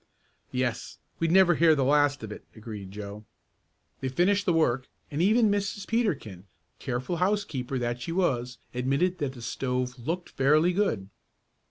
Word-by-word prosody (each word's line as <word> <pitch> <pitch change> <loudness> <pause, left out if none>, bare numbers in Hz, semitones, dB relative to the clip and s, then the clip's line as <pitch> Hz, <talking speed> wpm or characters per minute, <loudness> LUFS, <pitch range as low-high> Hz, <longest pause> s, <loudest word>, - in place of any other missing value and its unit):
"Yes; 125 -1 -2 0.2
we'd 165 - +1
never 185 -1 +6
hear 160 0 +5
the 140 - +1
last 145 0 +3
of 110 - -6
it," - - -8
agreed 105 -3 -8
Joe. 105 +1 -7 0.8
They 130 - -2
finished 190 +8 +2
the - - +5
work 135 -6 +2 0.2
and 145 +2 -1
even 215 +3 +4
Mrs. 200 0 -2
Peterkin, 140 - -1 0.3
careful 125 +8 -3
housekeeper 180 -9 -1
that 120 0 -2
she 165 - -4
was, 125 -9 0 0.2
admitted 140 +9 0
that 140 -3 -2
the 120 -3 -10
stove 125 0 -2
"looked 170 +9 -3
fairly 155 +6 +3
good." 175 - 0
140 Hz, 155 wpm, -27 LUFS, 120-180 Hz, 0.8 s, never